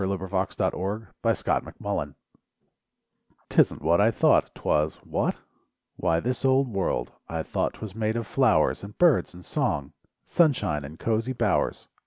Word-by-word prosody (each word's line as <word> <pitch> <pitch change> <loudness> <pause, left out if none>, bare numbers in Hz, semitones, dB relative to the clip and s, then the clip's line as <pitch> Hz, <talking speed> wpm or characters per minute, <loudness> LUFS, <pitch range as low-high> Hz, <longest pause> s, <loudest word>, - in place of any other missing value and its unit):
42 95 0 -1
LIFE 95 +1 -1
WAVES 105 +3 -3
DISAPPOINTMENT - - -1 1.4
'Tisn't - - +3
what 85 +4 +4
I 110 - +5
thought - - +3
'twas; 75 +1 0
whatT - - 0 0.6
Why 80 0 +1
this 125 +8 -2
old 135 0 +3
world. 100 -4 -1 0.2
I - - -2
thought - - -2
'twas 110 -4 -8
made 110 +1 -1
of 115 -1 -2
flowers 115 -2 +2
And 100 +1 -10
birds 165 - +3
and 90 - -12
song, 70 -2 -1 0.3
Sunshine 105 - +2
and 75 +4 -10
cosy 115 +5 -1
bowers! - - 0
105 Hz, 140 wpm, -26 LUFS, 90-120 Hz, 1.4 s, I